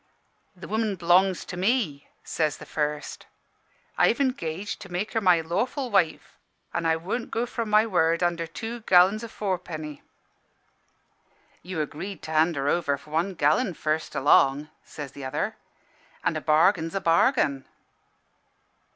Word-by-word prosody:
"'The 180 -2 -10
woman 220 -1 -1
b'longs 180 +1 +3
to - - -7
me,' 185 - 0 0.2
says 155 -2 -1
the - - -11
first. 150 -1 -4 0.7
'I've 235 - +4
engaged 205 - -2
to 195 - -10
make 185 +5 -2
her 225 - +1
my 180 -4 +4
lawful 240 - -2
wife; 180 -6 0 0.3
an' 170 - -1
I 160 - +3
won't 195 +9 -4
go 230 +2 -1
from 230 -2 -4
my 215 +1 +5
word 170 -4 +1
under 170 -1 0
two 225 +8 -6
gallon 185 +3 +6
o' - - -5
fourpenny.' 175 -8 -5 1.6
"'You 180 -3 -4
agreed 155 +5 -6
to 155 - -7
hand 160 +2 +3
her 140 0 -2
over 145 -3 +1
for 145 +2 -17
one 175 +5 0
gallon, 165 - +2
first 155 +1 -2
along,' 140 +1 +3
says 145 -3 -8
t'other,' 135 -1 -3 0.7
an' - - 0
a - - -2
bargain's 165 +2 +3
a - - +1
bargain.' 165 - +2
175 Hz, 145 wpm, -26 LUFS, 155-205 Hz, 1.6 s, gallon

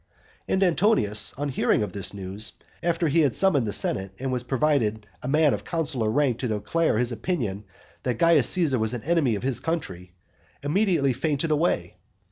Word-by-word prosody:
IX. - - -1
And 190 - +2
Antonius, 175 - +3
on 145 +2 -3
hearing 125 -4 +1
of 105 - -5
this 100 -2 -1
news, 100 +2 -3 0.3
after 170 -1 0
he 155 +3 +2
had 145 -6 +2
summoned 150 - +2
the - - -1
senate, 95 0 0
and 130 0 -2
provided 125 -6 0 0.2
a - - -6
man 150 +1 +3
of - - -4
consular 135 -9 -1
rank 130 -1 +1
to 125 - -2
declare 110 +7 0
his 125 +1 0
opinion 110 - -3 0.4
that 125 -3 -2
Caius 160 -4 +4
Caesar 155 -9 +2
was 110 +2 0
an 120 - -6
enemy 150 -7 +1
of 100 - -6
his 130 -2 -1
country, 95 - -4 0.5
immediately 155 -4 +2
fainted 155 +4 -1
away. 145 - 0
135 Hz, 180 wpm, -25 LUFS, 110-165 Hz, 0.5 s, Caius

